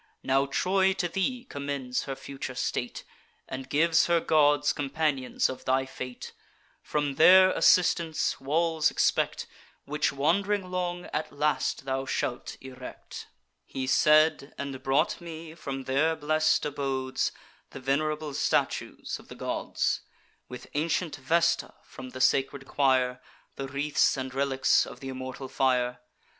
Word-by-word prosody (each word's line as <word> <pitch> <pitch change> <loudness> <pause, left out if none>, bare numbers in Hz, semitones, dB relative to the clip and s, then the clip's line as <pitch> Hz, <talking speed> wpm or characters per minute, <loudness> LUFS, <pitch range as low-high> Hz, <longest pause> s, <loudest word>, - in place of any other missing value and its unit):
Now 135 +1 +2
Troy 190 +6 +2
to 180 -2 -1
thee 240 +8 -2
commends 140 -3 -3
her 135 - -4
future 135 -1 -7
state, 125 0 -3 0.4
And 130 0 -7
gives 160 +2 +3
her 170 -1 +3
gods 145 -2 +3
companions 145 -2 0
of 130 - -7
thy 130 +1 +2
fate: 125 -1 -8 0.5
From 145 -2 -2
their 185 +3 +8
assistance 170 -4 +3
walls 160 +3 +2
expect, - - +1 0.4
Which, 150 +1 0
wand'ring 185 +7 0
long, 175 -1 -2
at 155 - -2
last 150 -1 -1
thou 135 0 -2
shalt 120 -2 -3
erect.' 130 -1 -9 0.4
He 130 -1 -5
said, 150 +2 +3
and 140 -2 -5
brought 135 +5 +1
me, 165 -1 -8
from 135 -5 -6
their 145 +5 +1
blest 155 0 +1
abodes, 135 -2 -1 0.4
The - - -9
venerable 150 +3 -1
statues - - -1
of - - -16
the - - -10
gods, - - -1 0.5
With 125 - -8
ancient 155 0 -1
Vesta 165 +6 +1
from 130 -1 -10
the 130 +1 -7
sacred 135 +1 +2
choir, 130 -2 +2 0.3
The 135 - -5
wreaths 140 +2 +1
and 130 -1 -4
relics 135 -1 +2
of - - -10
th' - - -16
immortal 130 0 -6
fire. 125 -2 +1
140 Hz, 135 wpm, -28 LUFS, 130-160 Hz, 0.5 s, their